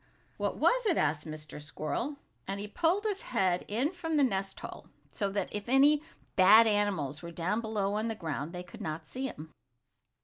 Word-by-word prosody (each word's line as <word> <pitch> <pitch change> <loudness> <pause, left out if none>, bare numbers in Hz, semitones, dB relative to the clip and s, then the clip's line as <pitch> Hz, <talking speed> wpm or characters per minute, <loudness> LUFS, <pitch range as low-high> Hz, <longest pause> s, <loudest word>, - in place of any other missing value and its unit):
"What - - -1
was - - +3
it?" 350 - +3
asked 150 +1 0
Mr. 155 -1 -7
Squirrel, 155 - -3 0.3
and 195 +1 -3
he 205 - -4
pulled 335 - +1
his 415 -2 -1
head 185 -6 +1
in 245 +9 0
from 325 -3 -2
the 290 - +5
nest 195 -6 -1
hole, - - -8 0.2
so 200 +5 -1
that 195 -1 -2
if 210 +2 -5
any 285 +3 +5 0.3
bad 210 +5 +8
animals 195 -9 +1
were 170 - -7
down 175 +6 -1
below 210 -3 -1
on 215 +2 -1
the 225 - -2
ground 160 -4 -4
they 180 0 -6
could 175 - -12
not 155 0 -4
see 265 +1 -3
him. 155 - -9
205 Hz, 195 wpm, -31 LUFS, 165-260 Hz, 0.3 s, bad